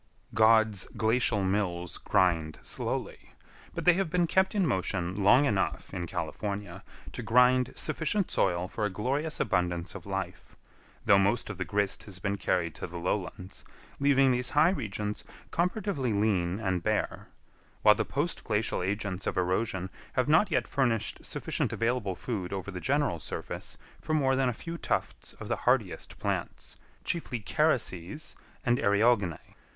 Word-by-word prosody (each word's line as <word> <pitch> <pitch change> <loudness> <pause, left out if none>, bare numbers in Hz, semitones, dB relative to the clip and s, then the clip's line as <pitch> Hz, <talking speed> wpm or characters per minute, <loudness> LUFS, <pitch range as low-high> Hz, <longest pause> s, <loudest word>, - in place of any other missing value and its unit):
God's 110 -2 +4
glacial 110 -2 +2
mills 90 -3 -1
grind 80 -4 +1
slowly, - - -3 0.4
but - - -4
they 175 - +8
have 190 -1 0
been 175 +1 +2
kept 190 +4 +2
in 195 -3 +3
motion 95 - -1
long 120 +8 +6
enough 100 -8 -1
in 85 -2 -3
California 100 0 -4 0.3
to - - -5
grind 125 +1 +4
sufficient 160 +5 -1
soil 90 -1 +1
for 105 +3 -4
a 105 - +2
glorious 135 - -2
abundance 90 -2 0
of - - -9
life, - - -5 0.5
though 100 - +6
most 105 +3 +1
of 95 - -9
the 95 - -1
grist 100 +3 -1
has 100 -3 -7
been 100 +1 -1
carried 90 -4 0
to - - -6
the 85 0 -8
lowlands, 90 +1 -3 0.4
leaving 135 -1 +4
these 125 0 +1
high 160 +4 +6
regions 105 - -3 0.3
comparatively 180 - 0
lean 100 -3 +1
and 95 -5 -1
bare; 110 +2 -1 0.6
while 105 - +8
the 110 +1 -1
post 145 +9 -2
glacial 105 -2 0
agents 100 0 -2
of - - -2
erosion 95 +1 0 0.2
have 130 - +1
not 160 +7 +5
yet 160 - +1
furnished 120 -6 0
sufficient - - -2
available 115 -5 0
food 100 -6 -4
over 100 0 -4
the 90 -2 -6
general 140 - +1
surface - - -6 0.2
for 155 - -1
more 135 -3 +3
than 130 -1 +2
a - - -1
few 170 +6 -6
tufts - - -2
of - - -9
the - - -1
hardiest - - +1
plants, - - -3 0.3
chiefly 160 -8 -2
carices 120 - 0 0.3
and 120 -1 +3
eriogonae. 100 -4 +3
105 Hz, 155 wpm, -29 LUFS, 95-130 Hz, 0.6 s, they